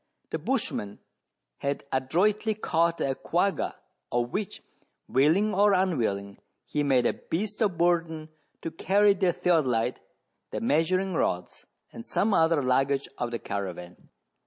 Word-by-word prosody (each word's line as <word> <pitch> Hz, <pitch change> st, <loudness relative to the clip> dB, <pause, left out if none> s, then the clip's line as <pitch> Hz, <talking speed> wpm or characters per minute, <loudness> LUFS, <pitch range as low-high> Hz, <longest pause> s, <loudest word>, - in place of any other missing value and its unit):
The -, -, -2 dB
bushman 100 Hz, 0 st, -2 dB, 0.6 s
had 140 Hz, 0 st, -2 dB
adroitly 200 Hz, -, +1 dB
caught 170 Hz, -4 st, +1 dB
a 135 Hz, -, +1 dB
quagga, 180 Hz, +8 st, -1 dB, 0.4 s
of 120 Hz, 0 st, 0 dB
which, 200 Hz, -1 st, -4 dB, 0.4 s
willing 165 Hz, +11 st, +3 dB
or 205 Hz, +1 st, +4 dB
unwilling, 115 Hz, -, 0 dB, 0.3 s
he 145 Hz, +4 st, -1 dB
made 130 Hz, -4 st, +3 dB
a -, -, +2 dB
beast 205 Hz, +6 st, -4 dB
of 195 Hz, -6 st, +1 dB
burden 165 Hz, -2 st, +1 dB, 0.3 s
to 165 Hz, -, -3 dB
carry 200 Hz, +4 st, +3 dB
the 185 Hz, -2 st, +2 dB
theodo 170 Hz, -5 st, +2 dB
lite, 120 Hz, +1 st, 0 dB, 0.5 s
the -, -, -3 dB
measuring 180 Hz, +9 st, +1 dB
rods, 90 Hz, -, -2 dB, 0.3 s
and 115 Hz, -, -8 dB
some 210 Hz, -, 0 dB
other 160 Hz, -4 st, +3 dB
luggage 135 Hz, +2 st, +1 dB
of 120 Hz, -, -1 dB
the 120 Hz, -, -3 dB
caravan. 90 Hz, -5 st, -6 dB
160 Hz, 135 wpm, -27 LUFS, 125-185 Hz, 0.6 s, or